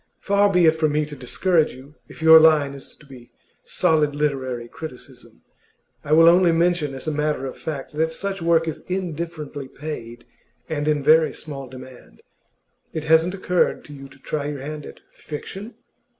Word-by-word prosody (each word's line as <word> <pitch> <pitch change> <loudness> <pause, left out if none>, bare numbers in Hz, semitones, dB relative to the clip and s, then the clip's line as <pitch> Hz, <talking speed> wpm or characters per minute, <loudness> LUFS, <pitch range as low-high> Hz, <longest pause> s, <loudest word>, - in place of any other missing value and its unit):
Far 200 0 +2
be 180 -2 +4
it 160 0 +5
from 155 -2 0
me 150 0 +1
to 150 0 -9
discourage 155 +5 0
you, 135 +3 -14
if - - -11
your 160 0 +9
line 155 -3 +4
is 140 -1 -11
to 150 - -20
be 125 -3 -14 0.3
solid 150 -2 +1
literary 130 -5 -2
criticism; 140 0 -11 0.6
I 145 - -6
will 165 +1 +7
only 175 0 +6
mention, 165 -4 +1
as 135 - -9
a - - +1
matter 150 -2 -1
of 130 - -6
fact, 145 -3 -6
that 160 +2 0
such 195 +2 -4
work 165 -1 +2
is 160 - -4
indifferently 165 -6 -5
paid 120 -5 -8 0.4
and 150 -2 -3
in 150 -2 +1
very 155 +2 +4
small 135 -3 -8
demand. 130 - -13 0.7
It 160 - -4
hasn't 160 +4 +3
occurred 180 -2 0
to 145 - -11
you 135 -1 -10
to 135 0 -18
try 145 +1 -4
your 145 -2 -5
hand 150 +1 -7
at - - -13
fiction? 195 - -8
155 Hz, 180 wpm, -22 LUFS, 140-165 Hz, 0.7 s, your